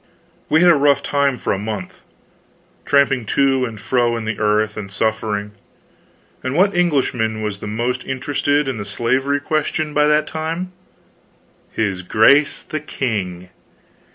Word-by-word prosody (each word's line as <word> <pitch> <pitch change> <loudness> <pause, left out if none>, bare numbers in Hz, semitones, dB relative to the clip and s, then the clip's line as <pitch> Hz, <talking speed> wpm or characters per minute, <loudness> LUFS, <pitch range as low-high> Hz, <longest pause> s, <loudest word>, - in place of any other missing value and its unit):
We 155 - +4
had 175 0 +7
a - - +5
rough 140 0 +3
time 140 -2 +1
for - - -1
a 95 - -3
month, 105 -3 -6 0.8
tramping 140 -3 +3
to 135 -2 +3
and 110 -3 -7
fro 120 +3 +1
in 115 - -5
the 110 -1 -3
earth, 105 0 +1
and 105 -2 -6
suffering. 105 0 -2 0.9
And 130 +2 -3
what 190 +3 +3
Englishman 125 -10 0
was 105 -2 -3
the - - -7
most 120 +4 -2
interested 145 +2 0
in 130 -5 -3
the - - -3
slavery 130 +7 0
question 155 +1 -1
by 150 0 +3
that 150 0 +3
time? 165 +3 -4 1.0
His 100 -4 -1
grace 140 +10 +3
the 155 - -4
king! 95 -11 -4
130 Hz, 150 wpm, -19 LUFS, 110-145 Hz, 1.0 s, had